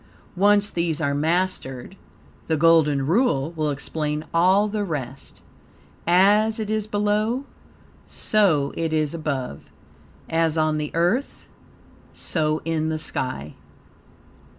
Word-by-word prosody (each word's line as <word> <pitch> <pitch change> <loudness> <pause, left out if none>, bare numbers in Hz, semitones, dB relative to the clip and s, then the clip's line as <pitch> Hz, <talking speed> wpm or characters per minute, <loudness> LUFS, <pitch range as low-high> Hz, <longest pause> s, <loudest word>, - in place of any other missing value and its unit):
Once 205 +2 +3
these 170 -2 -1
are 140 -3 0
mastered, 160 -2 -2 0.5
the 160 - +1
Golden 150 -4 +4
Rule 165 - +1
will 155 -2 -2
explain 150 +1 -3
all 185 +5 +4
the 210 0 -2
rest: 140 -7 -6 0.7
"As 205 +5 +4
it 215 -1 -3
is 215 -1 -1
below, 215 +5 0 0.6
so 165 -10 +1
it 165 -1 -2
is 155 -1 0
above; 140 - -3 0.7
as 165 -1 +1
on 155 -1 +1
the 150 -1 -3
earth, 180 +12 0 0.7
so 155 -2 -1
in 160 -1 -1
the 160 - -1
sky." 130 - -4
165 Hz, 115 wpm, -23 LUFS, 150-205 Hz, 0.7 s, Golden